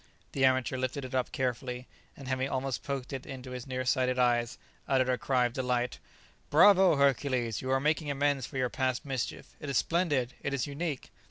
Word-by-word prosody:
The 135 - -1
amateur 130 0 +2
lifted 130 +2 -2
it 130 - -8
up 130 -1 0
carefully, 125 -1 -2 0.3
and 135 - -9
having 130 0 -1
almost 135 -1 -2
poked 140 -2 -4
it 135 -1 -6
into 130 -1 -8
his 125 +1 -6
near 130 -1 -3
sighted 130 0 +1
eyes, 120 -1 +2 0.3
uttered 130 -1 +2
a 130 - +3
cry 125 -2 +2
of 120 - -2
delight, 125 -1 -1 0.5
"Bravo, 185 +2 +6
Hercules! 130 -4 +1
you 130 - -4
are 135 0 +3
making 150 +1 0
amends 140 -2 0
for 135 - -7
your 125 -1 0
past 130 -1 -1
mischief; 135 -4 -4
it 145 - -6
is 135 - +1
splendid! 150 -8 +1
it 140 - -1
is 130 - -1
unique!" 145 -1 -4
130 Hz, 195 wpm, -30 LUFS, 125-140 Hz, 0.5 s, Bravo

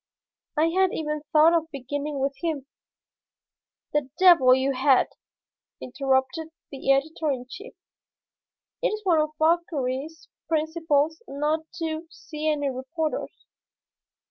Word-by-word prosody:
I 320 +2 +3
had 375 +2 +3
even 300 -1 -3
thought 315 +2 +6
of 325 -1 +1
beginning 285 +1 -4
with 275 +1 0
him." 315 -6 -2 1.3
"The 295 -3 0
devil 335 -9 +7
you 265 +1 +1
had!" 265 0 +3 0.7
interrupted 265 +4 -1 0.2
the 275 -1 0
editor 305 +3 +1
in 255 -3 -2
chief. 400 - -10 1.1
"It - - +3
is 430 -2 -4
one 335 -4 +4
of 305 0 -3
Fauchery's 315 -2 -1 0.2
principles 315 -1 0
not 305 +3 -2
to 325 -2 -4
see 310 -1 -4
any 290 -2 0
reporters. 300 +5 -4
305 Hz, 115 wpm, -25 LUFS, 275-325 Hz, 1.3 s, devil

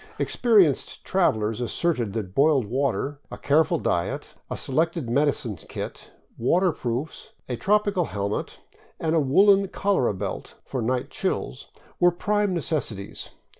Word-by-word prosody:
Experienced 205 - +2
travelers 110 - +1
asserted 120 - -1
that 105 -5 -4
boiled 140 -1 +3
water, 135 +4 -1
a - - -7
careful 160 +4 +2
diet, 85 - -2 0.2
a - - -3
selected 160 +1 0
medicine 130 -3 +1
kit, 80 - -8 0.3
waterproofs, 145 -2 -1
a 125 - -2
tropical 205 - +2
helmet, 100 -3 -4 0.4
and 160 -1 0
a 165 - +4
woolen 195 +8 +5
cholera 190 - +1
belt 95 +1 -5
for 130 - -3
night 125 +2 -1
chills 65 - -3 0.3
were 175 - +6
prime 205 +3 0
necessities. 150 - -3
145 Hz, 125 wpm, -25 LUFS, 115-175 Hz, 0.4 s, were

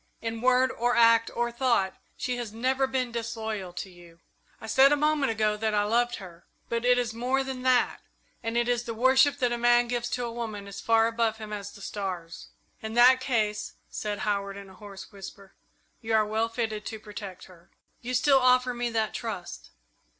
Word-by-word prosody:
In 225 0 -4
word 255 +1 +3
or 245 +1 0
act 230 -1 +5
or 240 0 0
thought 235 -6 +1 0.2
she 250 -1 -2
has 240 -3 -5
never 260 +4 0
been 260 -2 -2
disloyal 220 -5 -4
to 180 - -5
you. 170 -1 -17 0.4
I - - -9
said 265 +5 +5
a - - +5
moment 295 -3 +1
ago 215 -1 0
that 215 0 -1
I 205 - +3
loved 240 +3 +1
her, 175 -3 -12 0.2
but 235 0 -1
it 245 0 +4
is 240 -3 -1
more 255 +4 0
than 265 -1 -5
that 255 -1 +2 0.4
it 235 +1 0
is 240 -1 0
the 230 - -5
worship 265 +4 +4
that 250 -3 +1
a 240 - -2
man 240 0 +4
gives 240 0 -2
to 245 -1 -2
a 235 - -4
woman 220 -4 -5
as 200 - -8
far 225 0 +4
above 230 -1 0
him 215 -1 -7
as 205 -1 -6
the 200 - -14
stars." 185 -4 -5 0.3
"In 220 +1 -6
that 250 +2 +7
case," 215 -5 -1 0.2
said 210 -1 -3
Howard, 200 -1 -2
in 200 -1 -11
a - - -14
hoarse 195 +1 -11
whisper, 195 -1 -11 0.5
"you 225 -1 0
are 215 -1 +4
well 220 +2 -1
fitted 225 -2 -3
to 220 - -6
protect 205 -3 -9
her." 175 -2 -17 0.3
"You 250 +1 -3
still 270 +2 +4
offer 255 0 +3
me 240 0 -2
that 220 -2 -1
trust?" 180 - -6
230 Hz, 200 wpm, -27 LUFS, 210-245 Hz, 0.5 s, that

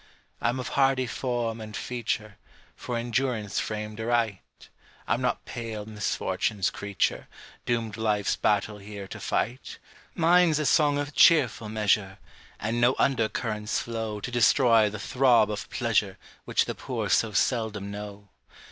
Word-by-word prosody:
I'm 120 +2 0
of 125 - -4
hardy 135 -2 +2
form 120 -3 -2
and 110 0 -7
feature, 110 -4 -4 0.4
For 120 -2 -4
endurance 120 -3 -1
framed 105 0 -4
aright; 115 -4 0 0.7
I'm - - +1
not - - -1
pale 110 -3 -6
misfortune's 105 -1 -1
creature, 100 -1 -2 0.4
Doomed 115 -3 -1
life's 105 -2 +1
battle 105 0 0
here 100 -1 -8
to - - -8
fight: 120 +5 -2 0.4
Mine's 170 -1 +4
a 155 - -1
song 145 0 +3
of 145 0 -3
cheerful 130 -11 +4
measure, 105 -2 +1 0.4
And 115 +3 -1
no 120 +2 +4
under 115 -5 +2
currents 105 -2 -2
flow 110 -2 -3
To 125 - -5
destroy 115 -2 +4
the 105 - -6
throb 120 -1 +3
of 105 - -5
pleasure - - 0 0.3
Which - - +2
the - - -3
poor - - -4
so 115 - +2
seldom 105 -3 0
know. 100 -1 -8
110 Hz, 140 wpm, -27 LUFS, 105-125 Hz, 0.7 s, Mine's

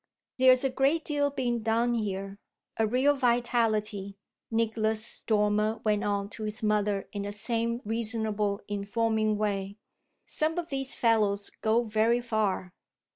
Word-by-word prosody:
"There's 255 0 +6
a 270 - +1
great 275 +5 +1
deal 290 -1 +1
being 245 -4 -1
done 230 +2 +1
here 195 -3 -3 0.4
a 220 - +1
real 260 +6 +3
vitality," 225 -5 0 0.3
Nicholas 220 -1 0
Dormer 210 0 +1
went 210 -1 +1
on 200 -1 -1
to 220 - -6
his 215 +2 -5
mother 210 -2 +1
in 205 - -3
the 200 0 -4
same 230 +3 -2
reasonable 215 -2 -1
informing 215 +1 0
way. 200 -1 -2 0.5
"Some 315 +2 +1
of 345 -1 -3
these 270 -1 -2
fellows 210 -3 +1
go 225 +2 +2
very 225 +2 +2
far." 215 -6 -1
220 Hz, 135 wpm, -28 LUFS, 205-240 Hz, 0.5 s, There's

